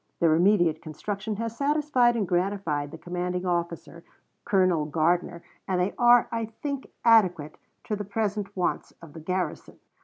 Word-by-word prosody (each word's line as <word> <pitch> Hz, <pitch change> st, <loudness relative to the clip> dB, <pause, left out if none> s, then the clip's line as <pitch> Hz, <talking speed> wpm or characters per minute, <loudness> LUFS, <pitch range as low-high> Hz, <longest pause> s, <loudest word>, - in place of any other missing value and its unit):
Their 165 Hz, -2 st, +4 dB
immediate 175 Hz, -2 st, +3 dB
construction 200 Hz, +7 st, -5 dB
has 230 Hz, +1 st, -4 dB
satisfied 280 Hz, -3 st, +2 dB
and 210 Hz, -5 st, -1 dB
gratified 175 Hz, -5 st, -1 dB
the 160 Hz, -, -9 dB
commanding 180 Hz, +1 st, -3 dB
officer, 170 Hz, -1 st, -3 dB, 0.4 s
Colonel 185 Hz, -7 st, +2 dB
Gardiner, 170 Hz, +3 st, 0 dB, 0.2 s
and 185 Hz, -1 st, 0 dB
they 180 Hz, +3 st, 0 dB
are, 240 Hz, 0 st, +6 dB
I 230 Hz, -1 st, -2 dB
think, 275 Hz, +5 st, -6 dB, 0.2 s
adequate 185 Hz, -10 st, +3 dB, 0.2 s
to 210 Hz, -, -2 dB
the 205 Hz, -, -4 dB
present 205 Hz, -1 st, -3 dB
wants 180 Hz, -, -2 dB
of 165 Hz, -3 st, -13 dB
the 165 Hz, -, -9 dB
garrison." 180 Hz, +3 st, -4 dB
185 Hz, 150 wpm, -26 LUFS, 170-220 Hz, 0.4 s, are